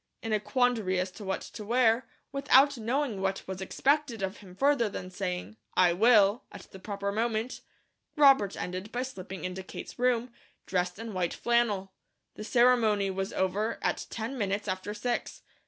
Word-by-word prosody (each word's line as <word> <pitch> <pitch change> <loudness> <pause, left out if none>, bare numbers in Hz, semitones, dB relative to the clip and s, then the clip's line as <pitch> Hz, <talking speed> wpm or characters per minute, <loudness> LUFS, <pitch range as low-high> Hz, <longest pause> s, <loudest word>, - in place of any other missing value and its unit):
In 225 -1 -2
a 215 - +3
quandary 225 -6 +1
as 185 +1 -2
to 210 - -10
what 190 -1 -2
to 215 - -8
wear, 230 +2 +2 0.2
without 280 0 +5
knowing 240 -2 -1
what 195 0 -1
was 190 0 -5
expected 265 +1 0
of 190 +1 -3
him 185 -3 -14
further 275 -1 +2
than 185 -2 -7
saying 90 - -4 0.2
"I 180 -2 +5
will," 215 +3 +5
at - - -9
the 190 - -11
proper 200 0 -3
moment, 225 +2 -1 0.5
Robert 275 - +5
ended 185 +4 -5
by 245 +1 -1
slipping 190 -8 -7
into 185 +1 -4
Kate's 190 - -9
room, 245 -1 +1 0.3
dressed 180 -1 -1
in 225 0 -6
white 180 -2 -1
flannel. 220 -5 +1 0.4
The - - -8
ceremony 220 -3 +3
was 190 +1 -3
over 200 +4 -1
at - - -1
ten 230 +4 -4
minutes 205 0 -1
after 190 +2 -3
six. 240 +3 -3
210 Hz, 170 wpm, -29 LUFS, 190-240 Hz, 0.5 s, without